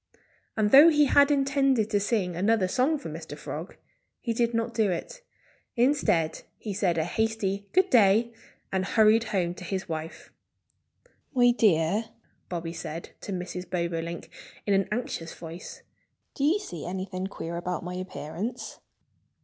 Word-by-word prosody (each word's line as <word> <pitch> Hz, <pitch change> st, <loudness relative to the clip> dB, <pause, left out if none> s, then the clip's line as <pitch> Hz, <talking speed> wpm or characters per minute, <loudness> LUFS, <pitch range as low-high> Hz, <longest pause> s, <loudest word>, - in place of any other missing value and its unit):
And 210 Hz, -1 st, +2 dB
though 290 Hz, +5 st, +10 dB
he 300 Hz, -2 st, +4 dB
had 280 Hz, +1 st, +5 dB
intended 275 Hz, -5 st, +2 dB
to 205 Hz, -, +3 dB
sing 200 Hz, -4 st, 0 dB
another 200 Hz, +2 st, +2 dB
song 265 Hz, +10 st, +1 dB
for 285 Hz, -, -8 dB
Mr. -, -, -7 dB
Frog, -, -, -7 dB, 0.4 s
he 235 Hz, -, -2 dB
did 235 Hz, 0 st, +1 dB
not 230 Hz, 0 st, -1 dB
do 220 Hz, -3 st, +2 dB
it. -, -, -4 dB, 0.5 s
Instead 235 Hz, -, +2 dB, 0.2 s
he 210 Hz, -, -5 dB
said 185 Hz, -4 st, +1 dB
a 160 Hz, -, +2 dB
hasty 205 Hz, +1 st, -1 dB
good 375 Hz, +1 st, +3 dB
day 225 Hz, 0 st, +5 dB, 0.4 s
and 190 Hz, -1 st, 0 dB
hurried 220 Hz, +3 st, +4 dB
home 180 Hz, -5 st, -1 dB
to 180 Hz, -, -10 dB
his 190 Hz, +2 st, -3 dB
wife. 160 Hz, -1 st, -6 dB, 1.0 s
"My 245 Hz, -1 st, +6 dB
dear," 205 Hz, -2 st, +2 dB, 0.4 s
Bobby 170 Hz, -2 st, -4 dB
said 165 Hz, 0 st, -6 dB
to -, -, -6 dB
Mrs. 180 Hz, -1 st, -5 dB
Bobolink 170 Hz, -1 st, -3 dB, 0.3 s
in 205 Hz, -, +2 dB
an 195 Hz, 0 st, +2 dB
anxious 210 Hz, -8 st, -3 dB
voice, 165 Hz, +1 st, -9 dB, 0.5 s
"do 275 Hz, -, -3 dB
you 325 Hz, +7 st, +4 dB
see 175 Hz, -, -7 dB
anything 185 Hz, +1 st, -4 dB
queer 170 Hz, -3 st, -6 dB
about 180 Hz, +1 st, -3 dB
my 180 Hz, +1 st, -5 dB
appearance?" 185 Hz, +4 st, -5 dB
200 Hz, 150 wpm, -27 LUFS, 175-235 Hz, 1.0 s, though